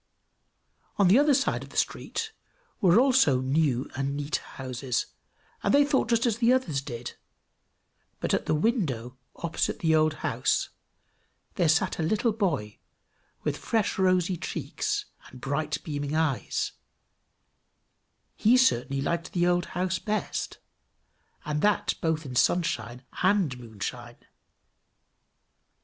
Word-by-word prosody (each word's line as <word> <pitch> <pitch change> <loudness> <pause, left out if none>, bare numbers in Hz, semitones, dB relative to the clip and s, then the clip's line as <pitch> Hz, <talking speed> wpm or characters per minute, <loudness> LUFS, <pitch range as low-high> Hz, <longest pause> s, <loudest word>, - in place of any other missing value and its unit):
On 200 -4 +4
the 215 +8 +7
other 290 -1 +4
side 270 - 0
of - - -10
the - - -9
street 445 -1 -2 0.5
were 185 +3 +6
also 255 - +4
new 135 -1 +1
and 140 +1 -2
neat 145 +1 -1
houses, 130 -1 -4 0.6
and - - +1
they 285 0 +6
thought 285 -2 +1
just 230 0 +2
as 230 -2 0
the 240 0 +4
others 180 - +1
did; 120 -4 -7 1.1
but - - -1
at - - 0
the - - +2
window 150 - -1 0.2
opposite 170 -1 -2
the 160 -1 +1
old 155 0 +3
house - - +1 0.8
there 175 -6 +2
sat 175 +4 +2
a - - +1
little 215 +8 +1
boy 160 - -2 0.6
with - - -1
fresh 220 -4 -1
rosy 185 -1 +2
cheeks 160 - -3 0.2
and 125 - -13
bright 145 +4 -2
beaming 145 -1 -3
eyes: 155 -5 0 1.6
he 235 +4 +4
certainly 135 - +2
liked 170 +2 -2
the 175 -1 +2
old 175 0 +2
house 185 0 0
best, 215 -3 -3 0.9
and 150 0 -1
that 210 0 +2
both 160 -1 0
in 130 -2 -7
sunshine 125 -6 0 0.2
and 185 -9 +2
moonshine. 120 +1 -7
160 Hz, 130 wpm, -27 LUFS, 135-205 Hz, 1.6 s, the